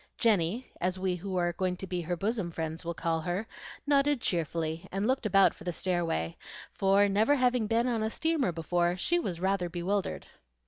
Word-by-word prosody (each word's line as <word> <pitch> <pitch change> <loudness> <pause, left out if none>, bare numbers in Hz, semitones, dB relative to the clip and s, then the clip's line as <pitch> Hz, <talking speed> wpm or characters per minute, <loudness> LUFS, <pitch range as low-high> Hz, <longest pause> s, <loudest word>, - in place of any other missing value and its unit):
Jenny, 215 +1 +1
as 185 +1 0
we 185 -1 -1
who 190 +2 -5
are 175 -1 +1
going 180 +1 -1
to 190 - -6
be 180 -1 -3
her 175 +1 -2
bosom 205 -1 -1
friends 160 0 -4
will 170 0 -4
call 165 -1 -1
her, 175 +6 -2 0.4
nodded 285 -1 +3
cheerfully, 165 -3 -2
and 195 +2 -1
looked 255 -2 +1
about 195 -1 +5
for - - -14
the 180 - -2
stairway; 165 - -1 0.4
for, 195 +1 +4
never 215 +8 +3
having 250 -4 +2
been 230 +2 +2
on 235 -3 0
a 220 - 0
steamer 315 - 0
before, 175 +2 0
she 345 - +1
was 180 - -3
rather 190 -1 0
bewildered. 185 +3 -2
185 Hz, 190 wpm, -30 LUFS, 175-220 Hz, 0.4 s, about